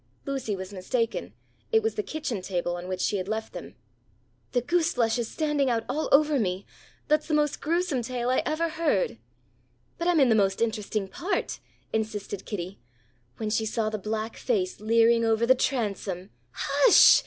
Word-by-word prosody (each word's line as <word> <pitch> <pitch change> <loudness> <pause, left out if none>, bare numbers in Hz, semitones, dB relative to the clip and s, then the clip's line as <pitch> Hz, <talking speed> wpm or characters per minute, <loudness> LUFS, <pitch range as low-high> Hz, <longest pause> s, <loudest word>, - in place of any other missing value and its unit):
Lucy 270 -7 -2
was 190 +1 -7
mistaken. 230 +5 -2 0.4
It 445 -1 +4
was 445 - 0
the 425 - -1
kitchen 300 - -4
table 175 -2 -2
on 175 +1 -6
which 185 0 -3
she 205 - +1
had 185 0 -4
left 220 +1 -3
them. - - -8 0.8
"The 245 - +2
goose 335 +6 +1
flesh 230 -1 +2
is 235 - -1
standing 295 -4 0
out 230 -2 +1
all 310 +2 -1
over 295 0 +5
me! 190 -2 -1 0.4
That's 305 0 +2
the 310 - +1
most 295 -1 +1
gruesome 330 -4 0
tale 245 +1 -2
I 255 - +3
ever 330 +2 0
heard." 330 +9 0 0.8
"But 340 - -1
I'm 350 -3 +4
in 265 -3 +5
the - - +5
most 195 -3 +2
interesting 215 -3 -1
part," 360 - -2 0.3
insisted 210 -3 -3
Kitty. 190 -2 -5 0.6
"When 215 -1 -3
she 220 0 +1
saw 215 0 -1
the 215 - -3
black 215 +2 -3
face 380 -6 -1
leering 230 +1 +4
over 225 0 +2
the 255 - +7
transom 205 -8 -2
" - - -41
"Hush!" - - +6
230 Hz, 180 wpm, -27 LUFS, 210-300 Hz, 0.8 s, the